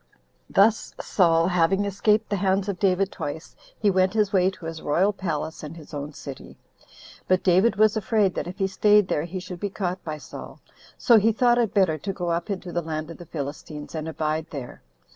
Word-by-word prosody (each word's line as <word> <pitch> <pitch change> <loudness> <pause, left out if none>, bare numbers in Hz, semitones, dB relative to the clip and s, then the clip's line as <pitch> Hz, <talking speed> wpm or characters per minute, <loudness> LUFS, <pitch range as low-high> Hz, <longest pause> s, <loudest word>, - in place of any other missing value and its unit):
10. - - -18
Thus 225 0 -2
Saul 165 -3 +3
having 180 +3 +2
escaped 210 +2 +1
the 205 - +1
hands 195 0 +1
of 200 -3 -3
David 195 0 +2
twice, 160 +3 -6 0.2
he 205 -2 +3
went 185 +1 +2
his 210 -2 +1
way 185 -1 +4
to 190 -3 -11
his 165 -1 -6
royal 185 +8 +2
palace, 165 -5 -4
and 155 +2 -8
his 155 -1 -13
own 145 0 -5
city: 140 -2 -10 0.7
but 185 0 +2
David 190 +5 +4
was 215 +1 +4
afraid, 210 -3 +1
that - - -4
if 180 - -7
he 195 - +1
staid 205 +1 +4
there 150 - 0
he 180 +2 -5
should 180 -1 -8
be 205 - -2
caught 185 -2 -3
by 155 -2 -4
Saul; - - -10 0.4
so 235 -4 +5
he 220 +2 +3
thought 240 +2 +3
it 230 -3 0
better 175 -6 +3
to 195 +7 -4
go 175 -2 -2
up 170 +2 -2
into 185 -3 -4
the 175 - -1
land 155 0 -4
of - - -11
the 175 - -11
Philistines, 150 0 -6
and 160 -1 -4
abide 155 0 -2
there. 135 -5 -8
185 Hz, 215 wpm, -25 LUFS, 160-200 Hz, 0.7 s, so